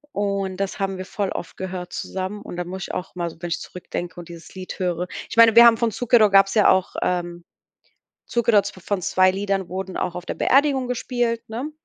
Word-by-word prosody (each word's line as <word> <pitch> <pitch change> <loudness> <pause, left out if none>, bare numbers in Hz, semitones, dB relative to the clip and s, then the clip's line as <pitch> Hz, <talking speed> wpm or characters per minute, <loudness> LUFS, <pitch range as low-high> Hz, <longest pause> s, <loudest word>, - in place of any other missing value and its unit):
Und 200 -2 -1
das 195 +1 -3
haben 195 -1 -2
wir 185 - -6
voll 200 -1 -3
oft 170 - -6
gehört 180 -1 -6
zusammen. 190 +2 -4
Und 175 - -8
da 180 - -1
muss 190 +2 -6
ich - - -6
auch 180 - -5
mal 170 -1 -2
so 160 - -14
wenn 175 - -4
ich - - -1
zurückdenke 175 -1 -7
und 170 - -9
dieses 170 +2 -12
Lied 185 +1 -8
höre. 180 -1 -1 0.2
Ich 225 - -7
meine, 230 -1 +7
wir 235 0 +10
haben 230 -1 +7
von 230 -1 0
Zucchero 225 -2 +4
gab's 195 +1 +4
ja 210 - +5
auch, 190 0 +2
ähm, 175 -1 -2 0.8
Zucchero 235 -3 +3
von 190 -1 -4
2 185 +2 +3
Liedern 195 -1 -2
wurden 190 0 -5
auch 180 - -2
auf 180 0 -7
der - - -3
Beerdigung 270 -2 +2
gespielt, 240 -1 -1
ne? 250 +7 -4
190 Hz, 220 wpm, -22 LUFS, 180-225 Hz, 0.8 s, wir